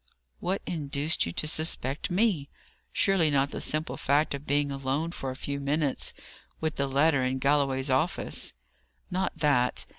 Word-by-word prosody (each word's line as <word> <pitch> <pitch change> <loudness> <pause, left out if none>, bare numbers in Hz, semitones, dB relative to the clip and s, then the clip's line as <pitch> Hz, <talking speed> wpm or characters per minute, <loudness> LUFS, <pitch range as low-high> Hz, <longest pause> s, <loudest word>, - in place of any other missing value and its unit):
"What 190 +2 -1
induced 150 - 0
you - - -3
to 155 - -2
suspect 155 -3 -1
me? 180 -6 +1 0.4
Surely 190 -5 +3
not 140 -1 +2
the - - -4
simple 155 +1 0
fact 145 +3 +2
of 140 +1 -6
being 145 0 +2
alone 135 +4 -1
for 135 -6 -4
a 130 - -4
few 140 +1 -4
minutes 140 0 0 0.5
with 160 0 -2
the 140 - +1
letter 140 0 +3
in 130 +1 0
Galloway's 135 -1 +2
office?" 145 +8 0 0.6
"Not 185 +1 -1
that. 130 -5 +2
145 Hz, 155 wpm, -28 LUFS, 135-160 Hz, 0.6 s, Surely